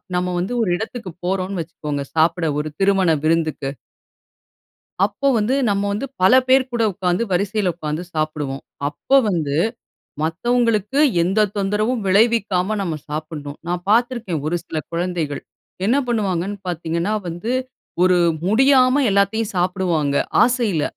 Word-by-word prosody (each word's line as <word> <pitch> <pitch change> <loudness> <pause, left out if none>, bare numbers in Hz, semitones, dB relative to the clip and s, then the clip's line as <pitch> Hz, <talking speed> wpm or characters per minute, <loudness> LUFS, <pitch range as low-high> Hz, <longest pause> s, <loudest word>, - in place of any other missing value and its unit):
நம்ம 180 0 0
வந்து 185 +7 -2
ஒரு 215 - +1
இடத்துக்கு 220 -1 -6 0.2
போறோன்னு 190 0 -1
வச்சுக்கோங்க. 150 -3 -5
சாப்பிட 165 +2 +2
ஒரு 150 +1 -3
திருமண 195 -2 +3
விருந்துக்கு 155 -4 0 1.3
அப்போ 220 +7 0
வந்து 225 +5 +1
நம்ம 200 0 +1
வந்து 220 +7 -2 0.2
பல 185 +6 +6
பேர் 260 0 +5
கூட 230 - +1
உட்கார்ந்து 180 +3 0
வரிசையில 200 +1 +1
உட்கார்ந்து 155 0 -4
சாப்புடுவோம். 150 -3 -2 0.3
அப்போ 150 - 0
வந்து 150 -6 -1 0.6
மத்தவங்களுக்கு 230 - +1 0.2
எந்த 200 +4 +2
தொந்தரவும் 210 +4 0
விளைவிக்காம 210 -1 +2
நம்ம 170 -5 -2
சாப்டனும். 150 -1 -6
நான் 175 0 -2
பார்த்திருக்கேன் 230 - +1
ஒரு 175 +2 0
சில 160 - -5
கொழந்தைகள். 170 -4 -2 0.5
என்ன 255 - +3
பண்ணுவாங்கனு 200 -4 -1
பார்த்தீங்கன்னா, 170 +3 -2
வந்து 175 +7 -4 0.5
ஒரு 185 -1 +4 0.3
முடியாம 260 +4 +4
எல்லாத்தையும் 200 +2 +1
சாப்புடுவாங்க 175 -5 0 0.3
ஆசையில. 230 - +1
185 Hz, 125 wpm, -20 LUFS, 165-220 Hz, 1.3 s, பல